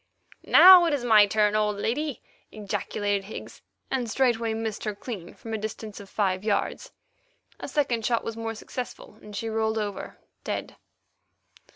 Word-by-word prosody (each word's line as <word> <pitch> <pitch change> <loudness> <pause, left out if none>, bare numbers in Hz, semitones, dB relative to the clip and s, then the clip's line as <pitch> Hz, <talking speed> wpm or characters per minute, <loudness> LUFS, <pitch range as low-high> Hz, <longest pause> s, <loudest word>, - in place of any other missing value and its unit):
"Now 365 -1 +9
it 320 -3 +2
is 250 -4 -4
my 215 -3 +6
turn, 210 0 +2
old 210 -1 +1
lady," 270 +6 -2 0.3
ejaculated 205 -1 -2
Higgs, 215 - -9 0.3
and 250 -3 -1
straightway 230 -2 +1
missed 220 -1 -4
her 210 -2 -3
clean 200 -6 -8
from 225 - -8
a 220 - -2
distance 215 0 -6
of 200 -1 -12
five 190 -2 -1
yards. 210 -2 -1 0.7
A - - -6
second 255 -7 0
shot 235 +1 +1
was 230 - -5
more 225 0 -4
successful, 225 -2 -8
and 210 -1 -11
she 225 - -3
rolled 220 0 -1
over, 205 -2 -4 0.3
dead. - - -4
220 Hz, 160 wpm, -26 LUFS, 210-235 Hz, 0.7 s, Now